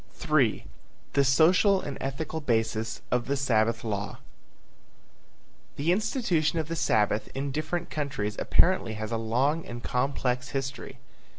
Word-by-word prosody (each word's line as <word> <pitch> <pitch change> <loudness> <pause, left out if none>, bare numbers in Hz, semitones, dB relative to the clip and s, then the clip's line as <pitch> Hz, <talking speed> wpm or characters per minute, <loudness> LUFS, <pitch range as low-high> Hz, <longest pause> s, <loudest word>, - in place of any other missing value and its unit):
III. - - +2 0.5
THE 140 - +4
SOCIAL 180 +8 +4
AND 140 - -5
ETHICAL 155 +4 -3
BASIS 115 -4 -1
OF 125 -1 0
THE 140 +1 0
SABBATH 115 -3 +1
LAW. 105 -2 -3 1.6
The 150 +5 +1
institution 180 - +1
of 160 -1 -2
the 165 - -2
Sabbath 105 -7 +1
in 140 +1 -2
different 155 +4 -3
countries 135 -9 -3
apparently 175 -12 +3
has 110 +1 -5
a 115 - 0
long 130 +8 +1
and 120 0 -8
complex 125 0 -1
history. 135 0 -5
135 Hz, 130 wpm, -27 LUFS, 115-155 Hz, 1.6 s, THE